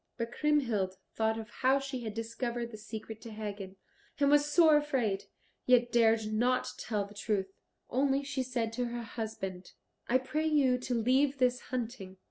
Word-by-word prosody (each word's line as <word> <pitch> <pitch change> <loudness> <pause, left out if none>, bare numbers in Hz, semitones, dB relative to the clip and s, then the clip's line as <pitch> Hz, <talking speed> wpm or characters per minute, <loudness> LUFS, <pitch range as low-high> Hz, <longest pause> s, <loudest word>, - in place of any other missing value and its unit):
But 230 -1 -3
Kriemhild 240 -11 +1 0.2
thought 220 0 +1
of 225 0 -7
how 260 +2 +3
she 270 -1 -4
had 220 -2 -5
discovered 235 +1 -3
the 215 - -8
secret 220 0 -8
to 230 - -8
Hagen, 205 -3 -6 0.4
and 280 0 +4
was 295 0 +4
sore 320 -2 +6
afraid, 255 -10 0 0.4
yet 245 -1 +5
dared 225 -2 +3
not 245 +3 +1
tell 210 -3 -1
the 200 - -13
truth. 195 -2 -2 0.3
Only 275 +2 +1
she 275 -1 -2
said 240 -3 -2
to 245 +1 -1
her 240 0 -4
husband, 200 -5 -6 0.3
"I 250 - +4
pray 305 +5 -1
you 270 -5 +3
to 250 0 -2
leave 265 +5 +2
this 250 -1 +2
hunting. 225 -6 -4
240 Hz, 170 wpm, -31 LUFS, 220-265 Hz, 0.4 s, sore